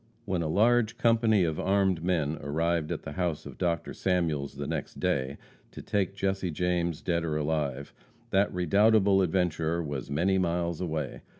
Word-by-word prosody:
When 95 -4 -1
a 80 - -1
large 115 +5 +3
company 115 -4 +3
of 80 -2 -1
armed 95 -4 +1
men 80 -4 0
arrived 80 +2 -1
at - - -4
the - - -6
house 85 -1 -2
of - - -10
Dr. 85 -3 -1
Samuels, 80 -7 -1
the - - -4
next - - -4
day, 65 +1 -1 0.3
to - - -10
take 100 -2 -1
Jesse 95 -1 -1
James 85 0 -1
dead 85 -2 0
or 80 -2 -1
alive, 75 -3 -2 0.4
that 100 +1 +3
redoubtable 100 +3 +4
adventurer 85 -2 0
was 70 -4 -5
many 90 +7 +1
miles 85 -1 -1
away. 80 -3 -3
85 Hz, 165 wpm, -28 LUFS, 80-95 Hz, 0.4 s, redoubtable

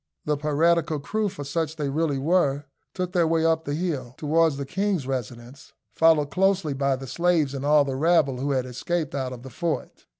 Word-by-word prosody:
The 150 - +1
piratical 155 +2 +1
crew, 210 +9 -1
for 180 -7 -8
such 160 +2 -2
they 150 -3 -2
really 150 0 0
were, 145 -1 +1 0.3
took 180 -1 -2
their 175 -3 +2
way 165 0 +1
up 160 0 +1
the 145 - -2
hill, 150 -8 -3
towards 160 -1 +2
the 140 - -4
king's 190 -1 -1
residence, 125 0 -6 0.2
followed 160 -3 +3
closely 190 -4 +1
by 140 0 +1
the 135 +1 -8
slaves 165 -1 +1
and 135 -1 -5
all 145 0 +4
the 135 - -3
rabble 150 -3 +2
who 140 +2 -2
had 130 -2 0
escaped 150 +5 -3
out 130 -2 -2
of 125 -1 -9
the 130 - -10
fort. 165 +6 -4
150 Hz, 200 wpm, -25 LUFS, 135-165 Hz, 0.3 s, all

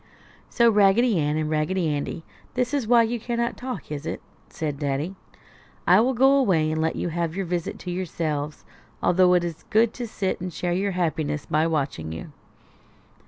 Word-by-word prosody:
"So, 235 -1 +4
Raggedy 210 +1 +4
Ann 150 0 0
and 155 -1 -1
Raggedy 160 +3 0
Andy, 150 +2 -3 0.3
that 250 +1 0
is 275 -6 0
why 235 0 +6
you 235 +1 -2
cannot 235 +1 -2
talk, 245 - -6
is 150 +1 -5
it?" - - -3 0.3
said 150 -3 -4
Daddy. 145 +5 -2 0.7
"I 180 +3 +6
will 250 +3 +2
go 270 +3 +5
away 170 - +2
and 160 0 -1
let 160 0 0
you - - -2
have 170 0 -2
your 195 -1 -2
visit 175 -1 -3
to 180 - -6
yourselves, 155 -5 -3 0.4
although 180 0 +5
it 175 - +2
is 165 -2 -5
good 220 +1 +3
to 240 -2 -5
sit 195 -4 -2
and 180 0 -4
share 175 +2 -2
your 195 +2 0
happiness 155 -4 -1
by 155 +2 +1
watching 140 - -2
you." 80 0 -7
175 Hz, 185 wpm, -24 LUFS, 155-215 Hz, 0.7 s, why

